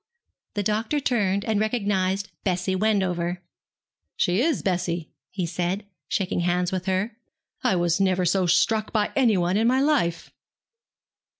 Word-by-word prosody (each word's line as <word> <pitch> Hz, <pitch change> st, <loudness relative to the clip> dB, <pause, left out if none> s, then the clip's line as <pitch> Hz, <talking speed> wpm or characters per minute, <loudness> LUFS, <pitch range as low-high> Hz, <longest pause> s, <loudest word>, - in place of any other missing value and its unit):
The 205 Hz, -, 0 dB
doctor 220 Hz, +8 st, 0 dB
turned 200 Hz, -7 st, 0 dB
and 215 Hz, -2 st, +1 dB
recognized 200 Hz, -3 st, 0 dB
Bessie 185 Hz, -1 st, 0 dB
Wendover. 185 Hz, -4 st, 0 dB, 0.8 s
'She 180 Hz, +5 st, +2 dB
is, 310 Hz, 0 st, +1 dB
Bessie,' 175 Hz, -3 st, -1 dB, 0.2 s
he 185 Hz, -3 st, -3 dB
said, 180 Hz, +4 st, -2 dB, 0.2 s
shaking 185 Hz, -2 st, -1 dB
hands 175 Hz, +1 st, +1 dB
with 185 Hz, 0 st, -3 dB
her. 190 Hz, +4 st, 0 dB, 0.5 s
'I 185 Hz, -8 st, +2 dB
never 185 Hz, -1 st, +2 dB
was 175 Hz, -, +3 dB
so 185 Hz, -1 st, +1 dB
struck 215 Hz, +5 st, +2 dB
by 210 Hz, -2 st, +1 dB
anyone 200 Hz, -8 st, +3 dB
in 225 Hz, +2 st, +3 dB
my 255 Hz, +2 st, +3 dB
life.' 270 Hz, -, +1 dB
190 Hz, 135 wpm, -25 LUFS, 180-215 Hz, 0.8 s, was